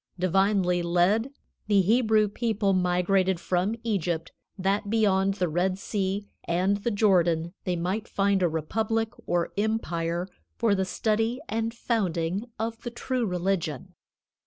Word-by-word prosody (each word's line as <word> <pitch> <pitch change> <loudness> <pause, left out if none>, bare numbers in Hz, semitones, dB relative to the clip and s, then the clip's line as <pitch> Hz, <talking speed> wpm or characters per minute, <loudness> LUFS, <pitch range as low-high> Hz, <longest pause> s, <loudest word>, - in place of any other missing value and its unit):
Divinely 185 0 +2
led, 180 +8 +2 0.4
the 205 -2 +4
Hebrew 220 0 +3
people 205 -2 0
migrated 180 0 +2
from 185 +5 0
Egypt 175 -7 -1 0.3
that 200 +2 0
beyond 195 -3 +2
the 185 -3 0
Red 180 +4 0
Sea 200 0 -2 0.2
and 185 +4 +1
the 205 +4 -2
Jordan 175 -6 +2
they 180 -2 0
might 185 +6 -2
found 195 -1 +1
a 175 - +3
republic 220 +8 -1 0.2
or 175 -1 0
empire 175 -5 -1 0.3
for 230 -3 +2
the 190 -1 +1
study 225 +5 0
and 225 +1 -1
founding 195 -5 -1
of 225 +1 -3
the 240 - -4
true 240 0 -2
religion. 180 -6 -2
195 Hz, 135 wpm, -27 LUFS, 175-220 Hz, 0.4 s, the